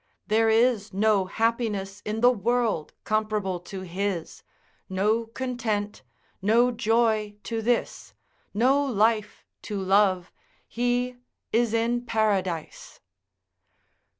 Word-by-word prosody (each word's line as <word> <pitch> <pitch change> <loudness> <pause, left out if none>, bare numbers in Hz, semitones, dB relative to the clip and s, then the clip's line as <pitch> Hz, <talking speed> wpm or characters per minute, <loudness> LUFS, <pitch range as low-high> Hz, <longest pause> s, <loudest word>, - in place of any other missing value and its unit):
There 225 +1 +3
is 225 -2 +2
no 205 -1 +3
happiness 210 -2 -1
in 215 +1 -3
the 245 +1 +7
world 230 -6 0
comparable 215 -4 -1
to 190 +2 -8
his, 185 -1 -4 0.5
no 210 +5 +1
content, 225 -4 -3 0.4
no 230 +5 +4
joy 225 -2 +1
to 225 +1 -3
this, 240 +1 -1 0.4
no 260 +7 +3
life 220 -4 0 0.2
to 205 -2 -4
love, 190 -1 +2 0.4
he 245 +1 -1 0.4
is 235 0 +2
in 235 +1 0
paradise. 195 -7 -1
220 Hz, 100 wpm, -26 LUFS, 200-235 Hz, 0.5 s, the